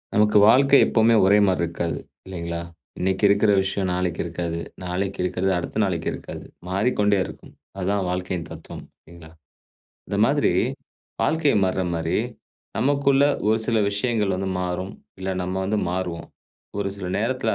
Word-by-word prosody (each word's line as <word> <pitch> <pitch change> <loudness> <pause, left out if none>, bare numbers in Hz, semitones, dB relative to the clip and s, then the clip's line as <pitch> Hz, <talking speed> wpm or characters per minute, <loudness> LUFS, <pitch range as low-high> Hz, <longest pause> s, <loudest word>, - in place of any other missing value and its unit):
நமக்கு 105 0 +4
வாழ்க்கை 135 +4 +6
எப்பவுமே 115 0 +3
ஒரே 100 +2 +5
மாரி 95 -2 +1
இருக்காது, 85 0 -2 0.3
இல்லைங்களா? 85 -2 -5 0.4
இன்னைக்கு 95 +2 -1
இருக்குற 100 +1 +4
விஷயம் 95 0 -1
நாளைக்கு 90 -1 -1
இருக்காது. 85 0 -3 0.3
நாளைக்கு 95 +2 -3
இருக்குறது, 90 +1 0
அடுத்த 90 +4 -4
நாளைக்கு 85 -4 -1
இருக்காது. - - -8 0.3
மாறிக்கொண்டே 105 +1 +2
இருக்கும். - - -12 0.2
அதுதான் 95 +1 0
வாழ்க்கையின் 90 -1 -3
தத்துவம் 80 0 -9 0.2
இல்லிங்களா? 85 -1 -14 0.8
இந்த - - -2
மாதிரி - - +2 0.7
வாழ்க்கை 155 -3 +2
மாறுறமாரி, 90 -3 -1 0.6
நமக்குள்ள 140 0 +3 0.2
ஒரு 110 +1 +3
சில 115 -2 +2
விஷயங்கள் 105 -2 0
வந்து 95 0 -2
மாறும். 90 +2 -3 0.3
இல்ல 95 +1 -2
நம்ம 90 +1 -3
வந்து 105 +2 0
மாறுவோம். 90 -2 -4 0.5
ஒரு 100 -1 -1
சில 95 -2 -6
நேரத்துல 115 -1 0
95 Hz, 135 wpm, -23 LUFS, 90-105 Hz, 0.8 s, வாழ்க்கை